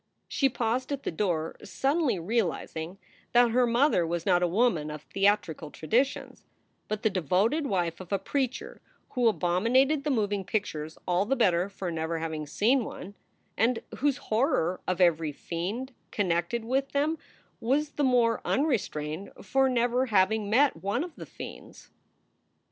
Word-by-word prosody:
She 275 - +2
paused 250 +2 -1
at 280 -1 -3
the - - -2
door, 165 -3 -1
suddenly 270 - 0
realizing 175 -3 -2 0.4
that 240 -1 +5
her 245 +1 +3
mother 235 - +3
was 170 0 -2
not 180 -2 +3
a 180 - +3
woman 175 -5 +1
of 150 0 -7
theatrical 195 -6 0
traditions, 240 - -1 0.4
but 215 -1 -3
the 220 - +4
devoted 195 - +1
wife 175 -6 -1
of 185 0 -10
a 200 - +2
preacher 260 +4 -3 0.3
who 245 -3 +1
abominated 230 - +2
the 300 - -1
moving 205 -6 0
pictures 160 -7 -3
all 180 +2 +2
the 270 +5 +1
better 185 -6 +2
for 190 -3 -5
never 165 0 -2
having 160 -2 -4
seen 235 - +2
one, 200 -2 -8 0.4
and 230 +2 +1
whose 280 -1 +1
horror 215 - 0
of 185 0 -1
every 165 -4 +3
fiend 195 - -4 0.2
connected 185 +4 -1
with 265 +3 -1
them 300 +3 +1 0.4
was 280 +5 0
the 295 - -2
more 240 -3 +3
unrestrained 195 - -1
for 270 +6 +2
never 245 +1 +1
having 210 0 +2
met 275 +6 +4
one 200 +8 0
of 345 -2 -8
the - - -9
fiends. - - -10
215 Hz, 155 wpm, -28 LUFS, 175-255 Hz, 0.4 s, that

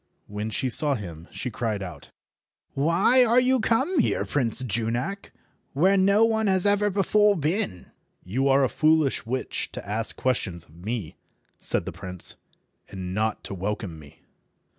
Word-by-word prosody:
When 105 +1 -5
she 130 - -2
saw 140 +3 +5
him, 85 -6 -8
she 125 - -5
cried 110 -3 -3
out— 90 -3 -9 0.6
"Why 170 - +4
are 240 +1 +4
you 255 +1 +3
come 265 +10 +1
here, 240 - +1
Prince 130 -3 -1
Junak, 120 - -3 0.4
where 185 +8 +3
no 200 +3 +4
one 220 -1 +1
has 190 -1 +2
ever 205 0 +3
before 205 +1 +3
been?" 150 - -2 0.3
"You 130 +9 -1
are 135 0 +4
a - - +4
foolish 155 -4 +1
witch 130 +2 -3
to - - -7
ask 110 +2 -1
questions 95 -10 -2
of 80 - -21
me," 100 -2 -5 0.4
said - - -1
the - - -4
prince, 90 -1 -1 0.5
"and 95 -2 -6
not 110 +2 -1
to - - -6
welcome 95 -3 -4
me." 75 +1 -17
130 Hz, 160 wpm, -25 LUFS, -, 0.6 s, saw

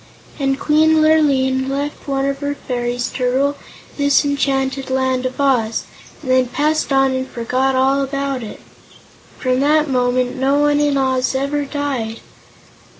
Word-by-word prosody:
And 270 -1 0
Queen 315 +1 +3
Lurline 270 -4 +2
left 285 +2 -4
one 275 -1 0
of 275 0 -2
her 285 0 -3
fairies 245 -2 -3
to 255 - -3
rule 275 +3 +1 0.4
this 285 0 +3
enchanted 270 -1 -1
Land 260 -1 0
of 255 - -9
Oz, 245 -5 +1 0.4
and 260 - -2
then 255 -1 +3
passed 300 +4 0
on 270 -1 +3
and 260 0 -2
forgot 255 +3 -1
all 270 +1 +2
about 275 -1 -2
it. 220 - -9 0.8
From 255 -1 0
that 300 +2 +3
moment 250 0 0
no 270 +2 +2
one 295 0 +2
in 290 -1 +1
Oz 260 -1 0
ever 280 +2 -1
died. 270 -6 -3
270 Hz, 150 wpm, -18 LUFS, 255-285 Hz, 0.8 s, Queen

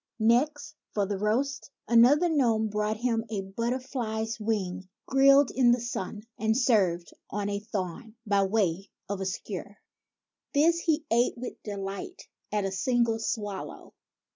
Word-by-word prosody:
Next, 275 +7 +2 0.2
for 205 -2 +2
the 195 0 -3
roast, 245 +7 -1 0.2
another 250 +9 +6
gnome 235 -9 +2
brought 210 +1 -1
him 230 -1 0
a 210 -3 -2
butter 230 +6 -2
fly's 225 -4 -3
wing 190 -4 -2 0.2
grilled 275 +1 +5
in 250 -2 +4
the 245 - +1
sun, 210 -3 -5 0.2
and 220 +2 +2
served 190 - +2 0.2
on 205 0 -2
a 200 0 -2
thorn 210 +2 -5
by 200 -1 +3
way 195 -2 0 0.2
of 200 -1 -3
a 190 - -1
skewer. 200 +1 -6 0.8
This 330 +4 +4
he 320 -2 0
ate 240 +2 +2
with 245 +1 -7
delight 200 - -6 0.2
at 210 -2 0
a 195 - -2
single 230 +3 +1
swallow. 205 -3 -5
220 Hz, 145 wpm, -28 LUFS, 200-250 Hz, 0.8 s, another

